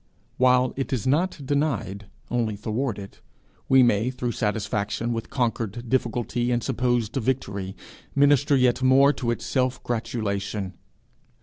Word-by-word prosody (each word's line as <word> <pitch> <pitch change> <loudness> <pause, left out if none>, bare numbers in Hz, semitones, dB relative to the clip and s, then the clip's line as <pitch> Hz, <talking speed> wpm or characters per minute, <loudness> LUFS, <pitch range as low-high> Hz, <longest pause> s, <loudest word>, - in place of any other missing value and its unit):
While 125 0 +4
it 135 +1 -3
is 125 -6 -1
not 150 +2 0
denied, 130 -9 -1 0.2
only 115 -3 0
thwarted, 105 -1 -4 0.5
we 130 -1 +7
may 115 0 +2
through 125 -2 -3
satisfaction 105 +1 -1
with 115 -1 -4
conquered 120 -2 -2
difficulty 120 -1 0
and 120 -1 0
supposed 120 -3 0
victory, 100 -7 -2 0.4
minister 145 0 +4
yet 130 -1 +3
more 135 +2 +5
to 120 -5 -3
its 120 - -2
self 130 -1 0
gratulation. 100 -4 -3
120 Hz, 125 wpm, -25 LUFS, 110-130 Hz, 0.5 s, we